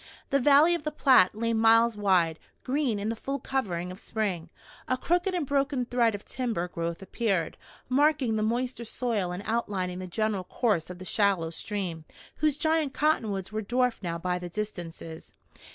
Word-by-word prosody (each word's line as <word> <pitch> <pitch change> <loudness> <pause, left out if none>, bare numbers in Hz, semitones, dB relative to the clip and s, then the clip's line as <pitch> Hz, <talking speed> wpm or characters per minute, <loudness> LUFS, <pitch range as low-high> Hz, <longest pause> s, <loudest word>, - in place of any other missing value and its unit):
The 275 - +4
valley 290 +5 +6
of 340 - -2
the 305 - -1
Platte 260 -11 +4
lay 230 +1 0
miles 225 +1 +4
wide, 180 -6 +2 0.2
green 260 -4 0
in 205 +2 -2
the 230 - -1
full 275 +5 -3
covering 185 -10 -2
of 185 - -10
spring. 190 -8 -3 0.4
A 255 - +1
crooked 355 +7 0
and 340 -4 -1
broken 275 -2 0
thread 235 -3 +2
of 205 - -9
timber 230 -9 -2
growth 170 +1 -4
appeared, 195 -5 -1 0.3
marking 275 -3 +2
the 215 - 0
moister 240 +2 -1
soil 225 -5 -2
and 180 +3 -5
outlining 195 -5 -2
the 185 - -6
general 210 +1 -1
course 200 -7 0
of 180 - -7
the 185 - -9
shallow 190 -5 +1
stream, 180 -4 -4 0.3
whose 300 -2 +2
giant 315 -2 +1
cottonwoods 215 -11 0
were 215 0 -2
dwarfed 245 +3 0
now 170 -3 -3
by 180 +1 -2
the 175 0 -6
distances. 175 -5 -7
220 Hz, 175 wpm, -28 LUFS, 185-255 Hz, 0.4 s, valley